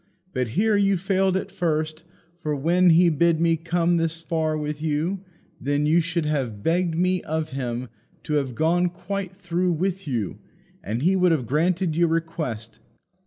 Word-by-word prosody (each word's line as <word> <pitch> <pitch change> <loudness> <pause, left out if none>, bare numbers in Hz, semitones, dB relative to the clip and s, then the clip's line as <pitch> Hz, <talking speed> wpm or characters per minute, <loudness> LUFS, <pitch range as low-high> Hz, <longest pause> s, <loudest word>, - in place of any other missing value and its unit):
But 125 -2 0
here 215 +1 +3
you 200 -1 +3
failed 190 +1 +1
at - - -5
first; 155 -1 -1 0.4
for 150 -3 -2
when 175 +6 +3
he 170 +2 +6
bid 165 +1 +2
me 165 0 +3
come 170 +1 +1
thus 165 0 -1
far 160 -2 -1
with 150 0 -4
you, 160 +5 -1 0.4
then 145 +1 0
you 160 +3 +4
should 170 -1 -1
have 130 -9 -2
begged 170 +2 +1
me 185 +2 +1
of 160 0 -3
him 125 -2 -3 0.4
to 150 - -3
have 135 -5 0
gone 175 +5 +2
quite 190 +1 -5
through 180 -1 0
with 185 +2 -2
you, 115 -8 -2 0.4
and 115 +6 -3
he 185 +3 +4
would 180 -2 +4
have 145 -7 +1
granted 165 - +1
your 170 +1 +3
request. 160 -9 -3
165 Hz, 170 wpm, -24 LUFS, 150-180 Hz, 0.4 s, he